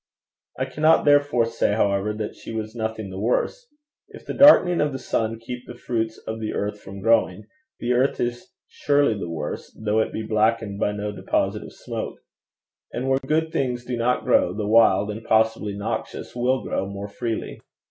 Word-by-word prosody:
I - - 0
cannot 155 +1 +3
therefore 145 -5 +4
say, 115 -2 0
however, 100 -1 +1
that 105 0 -4
she - - -9
was 110 -1 -4
nothing 110 -3 -4
the 95 - -6
worse. 300 - -1 0.4
If - - -13
the - - -4
darkening 185 - +7
of 150 -2 0
the - - -3
sun 115 -3 -1
keep 125 +2 -8
the 120 - -8
fruits 115 -2 -2
of 110 0 -4
the 110 -1 -3
earth 105 0 -3
from 100 0 -9
growing, 110 -3 +2 0.4
the 120 +1 0
earth 130 +3 +1
is 120 0 -3 0.2
surely 145 -4 +2
the 95 -4 -5
worse, 80 -1 -5
though 110 0 +1
it 110 - 0
be 110 - -4
blackened 110 -1 0
by 105 - +1
no 105 0 -3
deposit 105 - -1
of - - -10
smoke. - - -6 0.7
And 130 +2 -3
where 135 0 +3
good 155 +4 0
things 125 -4 -1
do 125 - -3
not 120 +1 0
grow, 90 - +3
the 105 -1 -2
wild 105 -2 +4
and 110 +2 -7
possibly 110 -2 +1
noxious 100 - -4
will 125 +2 +1
grow 95 - -2
more 100 +1 -6
freely. 115 +2 -4
115 Hz, 190 wpm, -23 LUFS, 105-125 Hz, 0.7 s, darkening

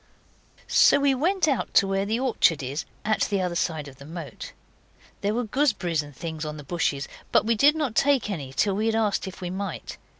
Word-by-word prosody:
So - - +5
we 280 -1 +3
went 345 +6 +1
out 275 -4 -1
to - - +6
where 195 +1 0
the 225 +3 0
orchard 220 - +2
is, 135 +4 -4 0.2
at 215 0 +1
the 200 -2 0
other 180 -2 -1
side 160 -3 -2
of 135 -1 -12
the 140 - -12
moat. 160 -6 -8 0.7
There 205 +2 0
were 245 - 0
gooseberries 215 - +1
and 145 -2 -12
things 160 +1 -5
on 150 0 -5
the 150 - -9
bushes, 145 -2 -1 0.2
but - - +4
we 230 - +3
did 285 +7 +5
not 295 -7 -1
take 275 0 +3
any 150 -10 -5
till 195 +8 +1
we 215 +3 0
had 225 - +1
asked 215 -3 0
if 190 0 -9
we 180 -1 -4
might. 190 -2 -5
195 Hz, 220 wpm, -25 LUFS, 160-230 Hz, 0.7 s, to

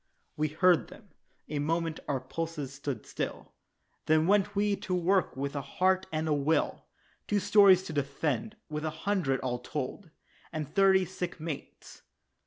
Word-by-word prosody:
We 155 +1 +1
heard 160 - +3
them, - - -15 0.4
a 150 -1 -3
moment 165 +2 -1
our 140 -2 0
pulses 150 +1 -5
stood 135 -4 -5
still, - - -5 0.5
Then 155 0 +4
went 205 +2 +3
we 205 0 +2
to 185 - -2
work 180 -3 +1
with 140 +1 -3
a 140 - -1
heart 185 +7 +1
and 155 0 -1
a 155 - +2
will 145 +2 0 0.4
Two 205 - +2
stores 200 -2 +6
to 160 - -6
defend 145 - -1
with 150 -1 -4
a 160 - 0 0.2
hundred, 175 -10 +1
all 125 -2 -2
told, 150 +7 -5 0.4
And 155 -2 -3
thirty 190 +1 +4
sick 180 0 -5
mates. 155 -2 -7
160 Hz, 160 wpm, -30 LUFS, 145-190 Hz, 0.5 s, stores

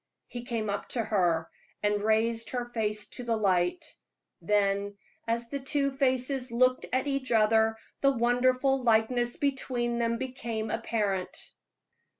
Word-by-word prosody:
He 240 - -7
came 230 -3 -2
up 200 0 -3
to 230 - +1
her 175 -7 +1 0.4
and 205 0 +1
raised 225 +2 +1
her 245 -1 -2
face 215 -3 -2
to 250 - -6
the 230 -2 0
light; 190 - +1 0.6
then, 200 +1 +1 0.3
as 235 +1 -1
the 280 - -2
two 275 +1 0
faces 260 -1 0
looked 255 +2 +2
at 260 +2 +1
each 275 -3 -2
other, 220 0 +3 0.2
the 275 - +5
wonderful 255 +2 +2
likeness 240 +1 +2
between 250 -4 -1
them 230 0 +1
became 230 -4 -4
apparent. 205 -5 -2
235 Hz, 140 wpm, -29 LUFS, 215-255 Hz, 0.6 s, the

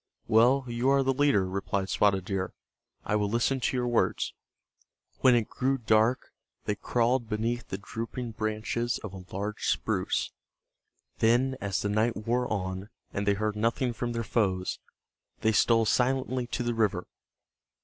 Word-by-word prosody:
"Well, 125 +5 +4
you 120 +2 0
are 140 0 +4
the 135 0 +2
leader," 130 -8 +3
replied 95 0 -2
Spotted 95 -2 +2
Deer. 95 -2 -2 0.5
"I 105 - 0
will 105 -1 +1
listen 120 +4 +1
to 130 - 0
your 125 0 0
words." 120 -1 +1 0.9
When 130 -2 +6
it 115 -3 +1
grew 135 +1 0
dark 110 +1 +2 0.3
they 105 - +1
crawled 120 +3 0
beneath 115 +3 -2
the 95 - -4
drooping 115 +4 -5
branches 110 +2 -2
of 105 -3 -6
a 95 -1 -8
large 105 +2 -3
spruce. - - 0 0.9
Then 125 +4 +3
as 100 -3 -1
the 105 - 0
night 110 +3 +1
wore 120 +3 -1
on, 95 0 -3 0.2
and 100 0 -2
they 100 - +4
heard 105 +1 -1
nothing 115 +3 0
from 120 +1 -3
their 115 0 -2
foes, 95 -5 0 0.6
they 110 - +3
stole 115 +1 +4
silently 130 +1 +1
to 125 - -2
the 120 0 0
river. 105 -6 0
115 Hz, 160 wpm, -28 LUFS, 105-120 Hz, 0.9 s, When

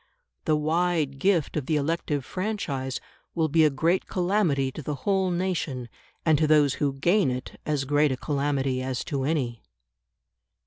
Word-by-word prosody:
The 155 - +3
wide 155 -2 0
gift 175 -3 +2
of 150 -4 -2
the 155 - +1
elective 150 -2 -1
franchise 145 -10 -3 0.4
will 160 -2 +1
be 160 +2 +4
a 155 - +6
great 165 +7 +1
calamity 175 -8 +1
to 155 - -7
the 150 +1 -3
whole 190 -2 +2
nation, 170 -9 -2 0.4
and 155 -3 +4
to 155 - +3
those 150 -2 +4
who 140 -2 +2
gain 175 +5 +2
it 125 0 -5
as 145 -3 0
great 145 +1 +3
a 130 - -1
calamity 140 -2 -1
as 130 -1 -2
to 135 -2 -2
any. 130 -7 -1
150 Hz, 165 wpm, -26 LUFS, 135-170 Hz, 0.4 s, a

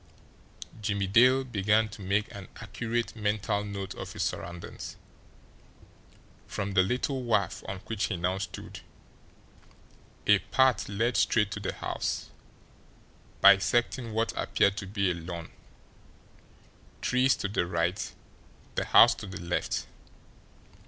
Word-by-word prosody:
Jimmie 100 -1 0
Dale 125 +7 +5
began 110 -2 +2
to 105 - -10
make 100 +2 0
an 100 -2 -9
accurate 115 +3 -3
mental 105 -1 -1
note 100 -2 -5
of - - -7
his - - -2
surroundings. 85 0 -5 1.5
From 100 0 -3
the 95 -1 +4
little 125 +7 -1
wharf 105 -7 0
on 95 -1 -5
which 110 -3 -2
he 95 - -2
now 90 +2 -1
stood, 95 - -7 1.5
a 105 -1 +6
path 120 +3 +2
led 115 +4 0
straight 105 -3 +2
to - - -4
the - - -3
house, - - -3 1.1
bisecting 115 +4 +4
what 110 +1 0
appeared 100 - +2
to 95 - -5
be 100 -1 0
a - - 0
lawn, 85 -1 -7 1.5
trees 125 +1 +3
to - - -3
the 100 -3 -1
right, 90 +3 -1 0.6
the - - -1
house - - +7
to - - -9
the 100 +1 -7
left. 85 -1 -2
100 Hz, 125 wpm, -29 LUFS, 95-115 Hz, 1.5 s, house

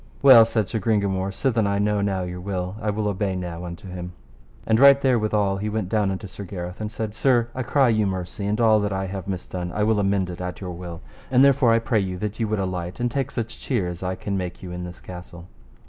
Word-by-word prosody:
Well, 125 -5 +9
said 110 -3 0
Sir 110 - -2
Gringamore, 100 -2 0
sithen 110 0 +1
I 100 0 0
know 105 0 +1
now 95 -2 0
your 90 0 -5
will, 90 0 -3
I 105 - -1
will 105 0 -1
obey 100 -1 -1
now 90 -2 -5
unto 85 +2 -8
him. 90 -1 -7 0.5
And 110 0 +3
right 140 0 +8
therewithal 110 -7 +1
he 105 +2 -2
went 105 -3 -2
down 105 -2 +1
unto 95 +1 -4
Sir 100 +1 -8
Gareth, 90 0 -6
and 105 0 -3
said: 110 -1 -4
Sir, 120 0 +2
I 130 - -3
cry 135 +1 +3
you 110 -2 +2
mercy, 95 +2 -4
and 105 +2 0
all 110 -2 +5
that 100 -1 -1
I 95 0 -1
have 95 -1 -6
misdone 90 -2 -4
I 105 - -1
will 110 0 +2
amend 100 -2 +1
it 85 - -8
at 90 -1 -5
your 90 -2 -5
will. 85 -1 -8 0.3
And 130 +1 +5
therefore 135 -3 +4
I 115 - +5
pray 115 -1 +1
you 95 -2 -2
that 105 +3 -4
ye 115 - 0
would 110 0 -1
alight, 90 -1 -3
and 120 0 0
take 135 0 -1
such 115 -3 -5
cheer 115 -10 -1
as 85 -1 -7
I 95 0 -2
can 100 +2 -4
make 90 -1 -4
you 90 - -7
in 90 0 -5
this 90 0 -9
castle. 90 -1 -10
100 Hz, 250 wpm, -24 LUFS, 90-110 Hz, 0.5 s, Well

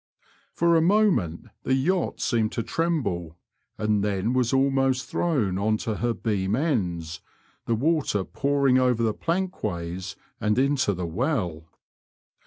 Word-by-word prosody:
For 170 0 +2
a 165 - +5
moment 170 - +2
the 130 - +1
yacht 170 +7 0
seemed 110 -3 +1
to 115 - -2
tremble, 105 - -2 0.4
and 105 -1 +1
then 105 +3 0
was 125 -2 +1
almost 135 -1 +2
thrown 115 - 0
on 110 +2 +1
ta 110 - -3
her 115 +2 -1
beam 100 -2 -1
ends, 90 - -1 0.5
the 115 - +2
water 140 - +1
pouring 140 +2 +2
over 125 -2 +2
the 110 -2 +1
plankways 95 - -3 0.2
and 105 +1 +1
into 135 -6 +2
the 90 0 -3
well. 90 - -2
115 Hz, 135 wpm, -25 LUFS, 95-140 Hz, 0.5 s, a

